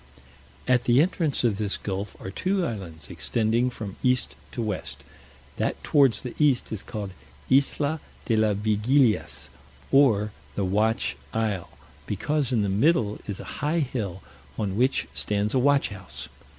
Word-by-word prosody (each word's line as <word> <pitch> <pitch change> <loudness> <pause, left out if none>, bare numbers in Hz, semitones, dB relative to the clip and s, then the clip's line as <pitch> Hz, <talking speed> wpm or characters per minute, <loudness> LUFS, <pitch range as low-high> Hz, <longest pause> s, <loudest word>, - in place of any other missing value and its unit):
At 125 -1 +3
the 120 +2 +5
entrance 160 -4 +1
of 110 -4 +2
this 105 -2 0
gulf 100 +1 -4
are 95 - -6
two 185 - 0
islands 85 - -6
extending 115 +2 +1
from 105 -6 -7
east 125 -1 +1 0.2
to 130 - -8
west; 105 -4 -3 0.5
that - - -1
towards 135 -7 +4
the 125 - -5
east 145 -5 +3
is 110 - -3
called 105 -4 -5 0.4
Isla 145 +3 +3 0.3
de 115 - +2
las 110 -2 +2
Vigilias, 110 +4 +2 0.4
or 110 -7 +4 0.2
the 100 - 0
Watch 110 +4 +1 0.2
Isle; 105 -5 -1 0.4
because 130 +7 0
in 115 -4 +2
the - - 0
middle 110 - +2
is 100 -3 -4
a - - -6 0.2
high 150 +3 +1
hill, 105 - -3 0.3
on 100 -3 -1
which 130 +5 +2
stands 105 0 0
a 130 - +3
watch 140 +2 +3
house. 100 -2 -8
110 Hz, 150 wpm, -26 LUFS, 100-135 Hz, 0.5 s, the